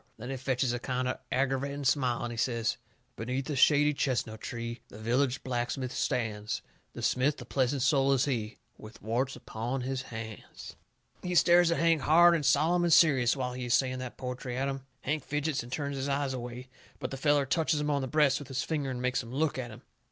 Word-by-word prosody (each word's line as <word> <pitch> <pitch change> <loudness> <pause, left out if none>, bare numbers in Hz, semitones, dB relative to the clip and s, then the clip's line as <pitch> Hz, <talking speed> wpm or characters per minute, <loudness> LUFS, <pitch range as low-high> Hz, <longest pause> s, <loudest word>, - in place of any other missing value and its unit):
Then 125 +4 -6
he - - -2
fetches 130 -1 0
a 120 - -2
kind 125 +1 -2
o' 125 - -2
aggervating 135 +2 -1
smile, 125 -3 +1
and 120 0 -3
he - - -6
says: 115 -1 0 0.4
"Beneath 125 +4 -3
a - - -1
shady 150 +2 +5
chestnut 120 -6 -1
tree 115 -1 -5
The - - -12
village 125 +4 0
blacksmith 125 +1 -2
stands. 110 -5 -2 0.3
The - - -7
smith, 140 +4 +1
a - - -8
pleasant 130 0 0
soul 135 +1 +3
is 135 0 +2
he 115 -6 -2 0.2
With 110 +1 -12
warts 125 +5 -1
upon 120 +4 -4
his 130 +1 -2
hands 110 -4 -9 0.2
" - - -37
He 180 0 -3
stares 175 +2 +6
at 170 - +1
Hank 165 -2 +3
hard 170 +4 +6
and 165 -3 0
solemn 165 +5 +3
and 170 - +2
serious 140 -6 +5
while 125 -1 -2
he 125 0 -5
is 120 -2 +3
saying 130 0 0
that 130 -1 -7
poetry 125 -1 -5
at 135 +1 0
him. 135 -1 -5
Hank 150 +1 -2
fidgets 150 +1 -1
and 120 +1 -11
turns 140 0 -3
his 135 +1 -2
eyes 140 -1 0
away. 125 0 -6 0.3
But 130 -3 -4
the - - -3
feller 145 0 +3
touches 155 +2 +1
him 150 0 0
on 140 -1 +1
the 130 - -3
breast 145 -1 +3
with 145 - -9
his 135 -1 -2
finger, 150 -4 -2
and 125 -1 -4
makes 125 +1 +1
him 115 -1 -10
look 145 +1 0
at 120 -2 -4
him. 110 - -12
130 Hz, 220 wpm, -30 LUFS, 125-145 Hz, 0.4 s, stares